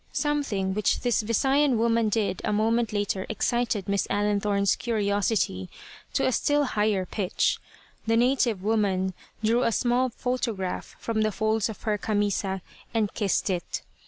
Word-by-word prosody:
Something 280 -11 0
which 210 +1 +1
this 245 -2 +2
Visayan 265 +4 +2
woman 230 -1 +2
did 205 -4 0
a - - 0
moment 225 +2 +1
later 205 -2 -1
excited 230 -1 0
Miss 200 0 0
Allenthorne's 205 -1 +1
curiosity 205 - 0 0.4
to - - +1
a - - +3
still 290 +3 +2
higher 210 -6 +1
pitch. 190 -1 0 0.5
The 225 0 +3
native 240 -5 +2
woman 195 -3 +1 0.3
drew 230 +3 +3
a 230 - +2
small 245 +2 +2
photograph 230 -6 -3
from 225 -1 -1
the 215 0 +2
folds 220 +1 0
of 220 - -8
her 210 -2 0
"camisa," 200 -3 -1 0.3
and 215 -3 +1
kissed 200 -3 0
it. 175 -2 -3
215 Hz, 145 wpm, -26 LUFS, 200-235 Hz, 0.5 s, a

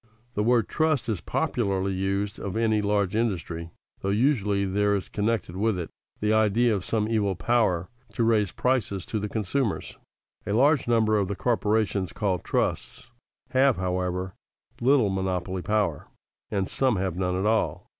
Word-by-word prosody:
The 105 - -1
word 115 0 +3
trust 155 -6 +1
is 105 -6 -1
popularly 100 -4 -1
used 100 +2 -2
of 100 +2 -4
any 110 -2 +2
large 100 -2 0
industry, 85 -7 -2 0.3
though 95 - -3
usually 105 -3 +2
there 100 +2 +1
is 95 - -3
connected 105 -4 -1
with 105 +1 +1
it 85 -2 -5 0.3
the 105 0 +2
idea 110 +2 +3
of 100 -3 -2
some 110 +1 0
evil 105 -4 +1
power 90 -2 +1 0.3
to 115 - 0
raise 110 -5 +2
prices 120 -8 0
to 110 - -3
the 105 0 -3
consumers. 110 +3 -2 0.5
A 100 - 0
large 140 +4 +3
number 110 -2 +3
of 100 - 0
the 100 - -3
corporations 105 -3 0
called 95 -5 -1
trusts 125 -1 -2 0.4
have, 130 -1 +4
however, 90 0 -2 0.5
little 125 -5 +3
monopoly 95 -1 -2
power, 105 +2 -1 0.4
and 95 -2 -1
some 130 -4 +1
have 95 -2 -1
none 90 0 -1
at 95 - -1
all. 110 +1 +1
105 Hz, 160 wpm, -26 LUFS, 95-115 Hz, 0.5 s, have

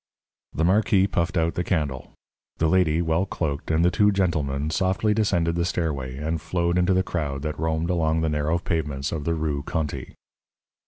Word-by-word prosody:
The 80 - -1
marquis 95 0 +3
puffed 90 -1 -1
out 80 0 +1
the 90 - -1
candle. 75 -8 -2 0.4
The 80 - +2
lady, 85 -1 +3
well 80 +4 +1
cloaked, 75 -6 -3
and 80 +1 +3
the 90 - +4
two 105 +2 +4
gentlemen 80 -6 0
softly 95 +6 +1
descended 90 -6 +1
the 85 0 0
stairway 70 -7 -2
and 80 +2 -2
flowed 85 0 0
into 90 +1 +3
the 95 - +3
crowd 75 -6 -3
that 75 -1 -4
roamed 80 +2 0
along 80 -2 +1
the 80 - +1
narrow 75 +2 0
pavements 75 -5 -2
of 75 -3 -4
the 85 - +1
Rue 75 -3 -1
Conti. 75 +1 -4
80 Hz, 180 wpm, -24 LUFS, 75-90 Hz, 0.4 s, the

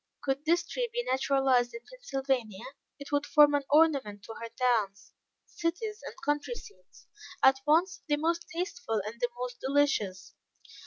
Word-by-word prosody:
Could 275 +2 -1
this 340 +2 +2
tree - - -3
be 485 +1 -2
naturalized 260 - +2
in 235 - -7
Pennsylvania, 265 - -3 0.3
it 280 0 -10
would 290 0 +2
form 295 -1 +6
an 285 - +2
ornament 280 -10 +3
to 225 - -8
her 230 - -5
towns, 225 -6 -1 0.3
cities 420 +6 -3
and - - -8
country 295 +11 -1
seats, 415 - -15 0.4
at 265 0 +6
once 340 +5 +3
the 295 -1 +2
most 335 +2 -1
tasteful 355 - -2
and 230 +3 -7
the 245 - +1
most 245 0 -5
delicious. 265 -9 0
280 Hz, 155 wpm, -29 LUFS, 245-335 Hz, 0.4 s, form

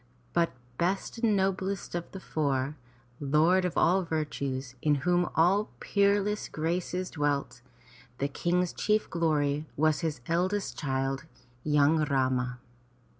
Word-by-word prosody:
But 170 -1 +2 0.3
best 190 +6 -1
and 225 -3 +3
noblest 190 0 -1
of 175 -1 -4
the 190 - -7
four, 140 -4 -1 0.4
lord 155 +6 +3
of 180 - -2
all 185 +3 +4
virtues, 140 -6 -3
in 150 -1 +3
whom 175 0 +3
all 190 +6 +3
peerless 200 +1 +1
graces 175 +3 -2
dwelt, 145 -4 -1 0.6
the 140 - 0
King's 175 +5 0
chief 215 0 +1
glory 150 -3 +1
was 155 0 +3
his 155 -7 -2
eldest 185 +4 0
child, 135 0 -2 0.4
young 150 +1 +4
Rama. 130 -3 0
165 Hz, 125 wpm, -29 LUFS, 145-185 Hz, 0.6 s, all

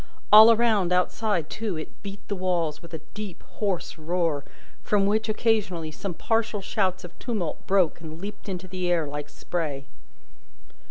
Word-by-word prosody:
All 220 +2 +11
around 220 -6 +3
outside, 180 -1 +1
too, 210 -4 -3
it 155 - -8
beat 200 0 -8
the 200 - -2
walls 175 -5 -1
with 170 - -12
a 155 - -7
deep, 210 -4 -7 0.2
hoarse 195 -5 -2
roar, 165 -3 0 0.4
from 205 -2 +2
which, 215 +2 +1
occasionally, 210 -8 +1
some 180 +3 -5
partial 225 +2 0
shouts 190 -1 -1
of 175 - -11
tumult 205 -10 -3
broke 190 -4 +3
and 160 0 -8
leaped 205 +2 -7
into 185 -1 -4
the 185 -1 -2
air 170 -3 +2
like 145 0 -5
spray. 145 -3 -3
185 Hz, 160 wpm, -26 LUFS, 165-210 Hz, 0.4 s, All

